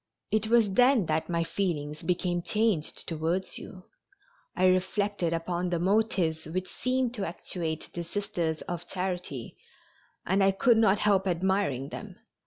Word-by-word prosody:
It 215 0 +2
was 225 -3 +4
then 245 0 +4
that 155 +1 -1
my 170 -1 +1
feelings 155 -5 -2
became 175 -1 0
changed 210 -5 0
towards 165 +3 -2
you. 185 -4 -10 0.7
I 185 - +2
reflected 185 0 +1
upon 175 +2 -1
the 175 - 0
motives 180 -4 +1
which 185 +4 -3
seemed 255 -1 0
to 210 -5 -3
actuate 165 -2 -4
the 170 - -4
Sisters 170 -3 -2
of 175 0 -5
Charity 180 -10 -4 0.7
and 195 +2 +2
I 195 0 +4
could 235 +4 +4
not 210 -3 +4
help 200 -2 +2
admiring 180 -7 0
them. - - -8
185 Hz, 145 wpm, -28 LUFS, 165-205 Hz, 0.7 s, was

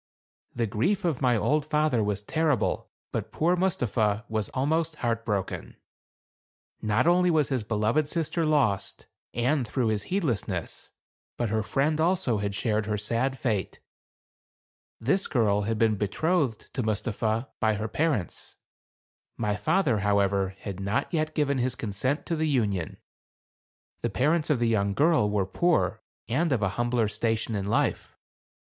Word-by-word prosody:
The 120 - +1
grief 180 - 0
of 160 -6 0
my 125 -3 +3
old 150 +7 +1
father 150 -6 +1
was 105 0 -2
terrible; 155 -1 0 0.2
but - - -3
poor 170 +3 +2
Mustapha 115 - 0
was 110 -2 -2
almost 155 +4 0
heart 115 -4 -1
broken. 100 -4 -3 1.1
Not 110 +5 +1
only 180 +1 +4
was 155 -4 +2
his 130 -4 0
beloved 110 +7 +1
sister 165 +1 -1
lost, 140 -11 +1 0.3
and 125 +2 +1
through 120 0 0
his 105 -2 0
heedlessness, 115 - -2 0.5
but 120 -2 -1
her 110 +1 +1
friend 150 +8 0
also 170 - +1
had 100 -1 -2
shared 110 0 0
her 105 -1 0
sad 115 +6 -1
fate. 110 -7 -2 1.2
This 145 - +1
girl 105 -6 +2
had 115 - 0
been 110 -1 +2
betrothed 135 - -1
to 130 - -1
Mus 110 -2 -1
tapha 115 +2 -1
by 110 -2 +2
her 110 +2 -3
parents. 145 - -2 0.8
My 105 -3 0
father, 135 - +1
however, 100 -1 +1
had 100 -3 -6
not 100 - -1
yet 155 -1 0
given 140 -3 +1
his 125 0 0
consent 125 - -2
to 170 - -1
the 160 0 0
union. 100 - 0 1.0
The - - 0
parents 155 +4 +1
of 150 - +3
the 120 0 +1
young 100 -3 +1
girl 150 -5 +3
were 100 -2 +1
poor 110 - +1 0.3
and 155 +8 +1
of 120 -6 +1
a 100 - +2
humbler 120 +2 0
station 110 +1 -1
in 100 -2 -2
life. 100 - -1
115 Hz, 155 wpm, -27 LUFS, 105-150 Hz, 1.2 s, only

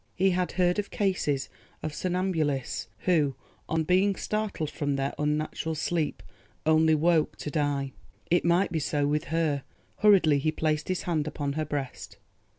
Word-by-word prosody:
He 190 +1 +3
had 180 0 0
heard 180 +2 +2
of 205 - -3
cases 185 -9 0 0.4
of 155 - -3
somnambulists 165 -7 -1
who, 150 -7 +2 0.3
on 160 0 +1
being 185 +4 +3
startled 210 -9 -2
from 145 -1 -1
their 135 0 -1
unnatural 155 +2 -1
sleep, 160 0 -1 0.4
only 160 0 +5
woke 160 0 +2
to 150 - -5
die. 145 -3 0 0.4
It 175 - +4
might 170 +3 +3
be 165 - 0
so 145 -1 0
with 150 +2 0
her. 160 -4 0 0.4
Hurriedly 185 -9 +5
he 155 +3 +1
placed 155 -1 -1
his 185 -1 -1
hand 155 -4 0
upon 145 -1 -2
her 155 +1 -1
breast. 140 -3 -5
155 Hz, 155 wpm, -28 LUFS, 145-180 Hz, 0.4 s, only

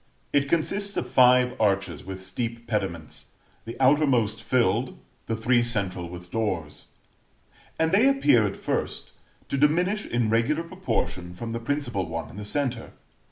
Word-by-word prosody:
It 140 -1 +2
consists 200 +6 0
of - - -1
five 125 0 +5
arches 100 -2 0
with 95 0 -7
steep 115 +4 -4
pediments, 95 -8 -3 0.4
the 115 +2 -8
outermost 130 -6 +3
filled, 120 0 +1 0.3
the 115 - -1
three 120 +2 +2
central 95 -7 -2
with 90 0 -10
doors; 95 -9 -3 0.9
and 160 0 +1
they 220 +8 +5
appear, 125 - +4
at 100 - -5
first, - - -3 0.4
to 140 - -1
diminish 180 +8 +2
in 120 -2 0
regular 115 +8 +1
proportion 90 - -3
from 115 +5 -6
the 115 - -3
principal 120 - -2
one 80 0 -5
in - - -12
the 105 - -6
centre. 125 -1 -2
115 Hz, 150 wpm, -26 LUFS, 100-140 Hz, 0.9 s, five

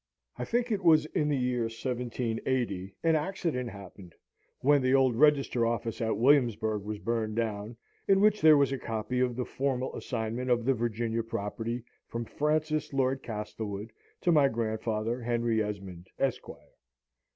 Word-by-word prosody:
I - - -4
think 240 0 0
it 200 -3 -1
was 155 -3 +6
in 150 -1 -1
the 145 - +1
year 125 -2 0
1780 115 -4 -2
an 165 -1 +4
accident 155 -7 -2
happened, 95 -3 -12 0.5
when 145 +1 +4
the 130 +1 +3
old 130 -3 +4
Register 140 -3 +3
Office 115 -1 -1
at 110 -1 0
Williamsburg 115 -5 +3
was 105 +1 -5
burned 110 -1 -2
down, 110 0 -3 0.3
in 195 -1 +5
which 210 +1 +4
there 155 -1 +8
was 140 -1 +3
a 135 - -2
copy 115 +2 -3
of 125 -1 +1
the 125 0 -2
formal 130 -1 -2
assignment 115 +2 -3
of 120 -1 +2
the 135 - +4
Virginia 115 -1 -1
property 115 +2 -4 0.2
from 115 0 -4
Francis 155 +3 0
Lord 135 0 +1
Castlewood 105 -1 -5 0.3
to 175 - +3
my 150 -4 +5
grandfather 110 0 -2
Henry 115 -1 +1
Esmond, 95 -4 -5
Esquire. 135 -3 -3
120 Hz, 155 wpm, -29 LUFS, 110-135 Hz, 0.5 s, there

